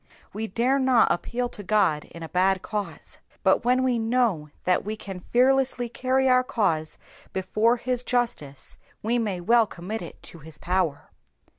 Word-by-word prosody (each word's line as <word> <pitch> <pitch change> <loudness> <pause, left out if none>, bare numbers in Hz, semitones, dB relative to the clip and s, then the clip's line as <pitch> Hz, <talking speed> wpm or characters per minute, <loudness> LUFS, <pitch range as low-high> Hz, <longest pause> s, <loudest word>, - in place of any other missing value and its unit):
We 220 +1 -3
dare 245 +7 +1
not 260 -3 +4
appeal 245 +7 -1
to 210 - -8
God 185 -7 +1
in 170 - -11
a 160 - -7
bad 190 +1 +2
cause, 210 -2 -5 0.2
but - - +3
when 250 +2 +3
we 250 -2 +1
know 225 -9 +1
that 180 - +2
we 215 +2 -4
can 195 -3 -7
fearlessly 255 -1 +2
carry 260 +2 +1
our 255 0 +5
cause 165 -11 -1 0.4
before 215 +5 +1
his 250 0 -2
justice 230 - -3 0.2
we 235 +3 +1
may 205 -6 -2
well 230 +4 +4
commit 205 +4 -6
it 170 - -9
to 170 - -10
his 155 0 -10
power. 175 -5 -1
220 Hz, 165 wpm, -25 LUFS, 180-245 Hz, 0.4 s, our